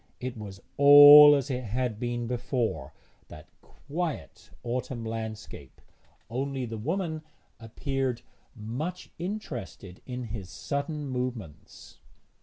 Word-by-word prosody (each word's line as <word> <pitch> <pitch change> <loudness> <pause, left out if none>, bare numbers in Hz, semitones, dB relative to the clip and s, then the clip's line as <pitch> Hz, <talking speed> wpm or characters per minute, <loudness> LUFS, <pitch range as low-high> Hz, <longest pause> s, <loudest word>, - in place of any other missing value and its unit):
It 130 0 -5
was 100 -3 -9 0.2
all 145 +1 +10
as 140 0 -2
it 125 0 -3
had 115 0 -3
been 120 -1 -3
before 115 - -3 0.4
that 75 - -13
quiet 160 +2 -6
autumn 120 -1 -4
landscape 110 -1 -7 0.5
only 130 +2 -3
the 115 -1 -7
woman 160 - -3 0.4
appeared 130 +2 -3 0.3
much 130 +12 -6
interested 155 - -7
in 125 -1 -5
his 100 -5 -7
sudden 145 +1 -4
movements. 125 - -7
125 Hz, 105 wpm, -27 LUFS, 115-145 Hz, 0.5 s, all